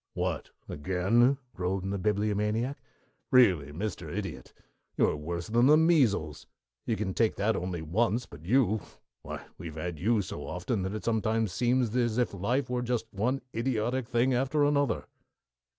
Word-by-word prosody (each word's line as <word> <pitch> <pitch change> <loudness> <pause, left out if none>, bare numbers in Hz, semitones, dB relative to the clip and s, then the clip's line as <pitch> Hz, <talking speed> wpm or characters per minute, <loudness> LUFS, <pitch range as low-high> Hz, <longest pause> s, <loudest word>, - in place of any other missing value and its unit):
"What, - - -2 0.2
again?" 95 - +2 0.2
groaned 95 +2 -2
the 100 - -2
Bibliomaniac. 105 +5 0 0.5
"Really, 90 - +4
Mr. 100 +6 -4
Idiot, - - -5 0.5
you - - +5
are - - 0
worse 85 +3 -4
than 120 +3 +3
the 150 +2 +7
measles. 115 - +2 0.4
You 115 - +1
can 100 -3 -2
take 115 +1 +2
that 105 +3 +1
only 90 -2 -3
once, 115 +8 +1
but 75 +2 -13
you 110 +1 +3 0.4
why, - - -7
we've 80 -3 -7
had 80 0 -4
you 110 +2 +2
so - - -7
often 95 +4 -2
that 95 +3 -3
it 110 - -5
sometimes 110 -2 +1
seems 120 +2 +1
as 120 -2 +1
if 125 -4 +1
life 120 +9 0
were 125 0 -1
just 120 -2 -1
one 125 +7 0
idiotic 120 +1 -1
thing 125 +1 +2
after 135 +4 +1
another." 145 -3 +1
110 Hz, 160 wpm, -29 LUFS, 95-125 Hz, 0.5 s, the